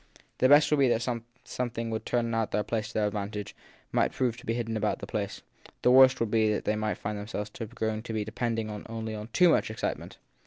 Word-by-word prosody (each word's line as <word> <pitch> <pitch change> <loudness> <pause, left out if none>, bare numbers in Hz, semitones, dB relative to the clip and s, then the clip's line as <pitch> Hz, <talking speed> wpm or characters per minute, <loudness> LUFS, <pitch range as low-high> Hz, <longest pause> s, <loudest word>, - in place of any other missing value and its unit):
The 130 - +4
best 145 +2 +6
would 150 - +3
be 135 - +5
that 120 -1 +1 0.4
something 115 -2 -3
that - - -3
would 110 - -4
turn 115 -1 0
out 115 -1 -1
to 105 - +1 0.3
their 110 - +1
advantage 105 0 -4 0.4
might - - +2
prove 125 -3 0
to 125 - -13
be 115 - 0
hidden 115 -2 -2
about 110 -1 0
the - - -7
place; 100 0 -4 0.4
the 125 - +5
worst 130 0 +7
would 115 -2 -1
be 110 -1 +3
that 105 - -2
they 105 - +1
might 110 0 -1
find 105 0 -4
themselves 105 0 -5 0.2
growing 110 -2 -1
to 110 -2 -3
depend 115 +1 -2 0.3
only 110 -1 -5
too 180 +7 +5
much 160 - +3
on - - -5
excitement. - - -4
110 Hz, 220 wpm, -28 LUFS, 105-120 Hz, 0.4 s, worst